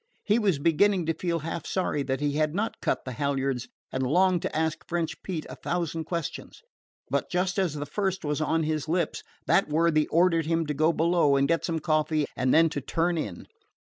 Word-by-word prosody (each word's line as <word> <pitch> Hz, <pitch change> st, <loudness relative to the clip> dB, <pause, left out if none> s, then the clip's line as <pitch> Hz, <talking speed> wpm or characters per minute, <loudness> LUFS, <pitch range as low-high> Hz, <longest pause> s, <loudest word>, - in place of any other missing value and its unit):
He 215 Hz, +2 st, +2 dB
was 195 Hz, -8 st, +2 dB
beginning 170 Hz, +5 st, +3 dB
to 165 Hz, -, +1 dB
feel 170 Hz, 0 st, -1 dB
half 165 Hz, 0 st, -5 dB
sorry 180 Hz, -6 st, -1 dB
that 135 Hz, 0 st, -2 dB
he 145 Hz, 0 st, +1 dB
had 155 Hz, +2 st, 0 dB
not 220 Hz, +3 st, -2 dB
cut -, -, -1 dB
the 130 Hz, -, -4 dB
halyards, 135 Hz, -1 st, -1 dB, 0.2 s
and 130 Hz, -, -2 dB
longed 175 Hz, +6 st, +3 dB
to -, -, -4 dB
ask 160 Hz, -1 st, -1 dB
French 170 Hz, -2 st, -2 dB
Pete 170 Hz, -5 st, -4 dB
a -, -, -8 dB
thousand 165 Hz, -2 st, -2 dB
questions; 170 Hz, -, -5 dB, 0.5 s
but -, -, 0 dB
just 180 Hz, +2 st, 0 dB
as 175 Hz, -6 st, 0 dB
the 145 Hz, 0 st, -4 dB
first 190 Hz, +3 st, -2 dB
was 150 Hz, +1 st, -1 dB
on 160 Hz, +1 st, +1 dB
his 155 Hz, -1 st, -2 dB
lips 170 Hz, -1 st, 0 dB, 0.2 s
that -, -, +3 dB
worthy 155 Hz, 0 st, +2 dB
ordered 165 Hz, -2 st, +3 dB
him 165 Hz, 0 st, +1 dB
to 150 Hz, -, -2 dB
go 155 Hz, +3 st, +3 dB
below 165 Hz, -3 st, +3 dB
and 140 Hz, 0 st, +3 dB
get 165 Hz, +2 st, +1 dB
some 165 Hz, -2 st, -1 dB
coffee 155 Hz, -1 st, +1 dB
and 130 Hz, 0 st, +1 dB
then 165 Hz, +1 st, +6 dB
to 145 Hz, -, -4 dB
turn 165 Hz, +5 st, 0 dB
in. 150 Hz, -, -4 dB
160 Hz, 210 wpm, -27 LUFS, 150-175 Hz, 0.5 s, then